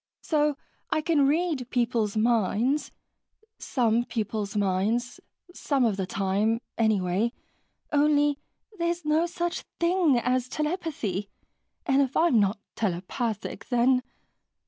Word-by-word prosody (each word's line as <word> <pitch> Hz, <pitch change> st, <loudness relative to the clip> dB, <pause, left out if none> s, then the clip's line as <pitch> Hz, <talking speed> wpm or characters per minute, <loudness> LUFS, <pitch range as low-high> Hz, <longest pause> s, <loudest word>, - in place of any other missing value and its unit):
So 300 Hz, -2 st, +1 dB, 0.3 s
I 310 Hz, -, +1 dB
can 300 Hz, -3 st, +3 dB
read 300 Hz, -5 st, 0 dB
people's 230 Hz, -4 st, 0 dB
minds 230 Hz, +5 st, +1 dB, 0.7 s
some 235 Hz, -3 st, +1 dB
people's 215 Hz, -3 st, -3 dB
minds, 205 Hz, +5 st, 0 dB, 0.3 s
some 275 Hz, -7 st, +1 dB
of 220 Hz, -4 st, +1 dB
the 190 Hz, -2 st, -3 dB
time, 200 Hz, +4 st, 0 dB, 0.2 s
anyway... 215 Hz, 0 st, +1 dB, 0.6 s
only 290 Hz, -1 st, +3 dB, 0.4 s
there's 340 Hz, -1 st, -1 dB
no 310 Hz, +3 st, +2 dB
such 345 Hz, 0 st, -3 dB, 0.2 s
thing 340 Hz, -5 st, +3 dB
as 250 Hz, +1 st, 0 dB
telepathy. 300 Hz, -, -2 dB, 0.6 s
And 275 Hz, 0 st, +3 dB
if 270 Hz, -1 st, 0 dB
I'm 325 Hz, -9 st, +4 dB
not 200 Hz, +1 st, +2 dB, 0.2 s
telepathic, 210 Hz, +3 st, -3 dB
then...." 250 Hz, +1 st, +3 dB
245 Hz, 110 wpm, -27 LUFS, 215-300 Hz, 0.7 s, I'm